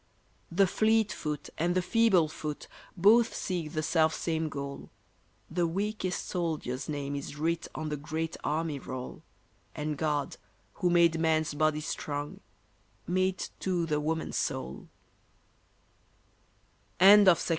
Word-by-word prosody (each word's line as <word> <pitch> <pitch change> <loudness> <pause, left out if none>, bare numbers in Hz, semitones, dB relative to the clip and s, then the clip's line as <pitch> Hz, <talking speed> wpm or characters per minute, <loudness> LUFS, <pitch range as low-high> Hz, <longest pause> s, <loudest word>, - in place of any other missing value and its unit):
The 195 +4 +4
fleet 220 +3 +2
foot 150 -1 -4
and 175 +2 +1
the 185 - +3
feeble 195 -5 +4
foot 150 -1 -6 0.3
Both 220 +6 +5
seek 170 -5 -3
the 155 - -1
self 160 0 +2
same 160 -1 -1
goal, 140 -1 -6 0.6
The 170 +1 0
weakest 195 +1 -2
soldier's 155 -8 -3
name 145 -1 -3
is 140 +1 -6
writ 165 +2 -1
On 155 0 -3
the 150 - -2
great 160 +3 -3
army 155 -1 -1
roll, 130 -1 -7 0.5
And 150 0 -3
God, 150 -3 -1 0.4
who 180 - +3
made 170 -2 +4
man's 160 -2 +1
body 155 0 +1
strong, 145 -1 -4 0.7
made 185 +1 0
too 180 -3 0
the 150 -2 0
woman's 160 +2 -2
soul 65 +1 -3 2.1
SOLSTICE. 190 -2 +7
160 Hz, 125 wpm, -29 LUFS, 150-180 Hz, 2.1 s, SOLSTICE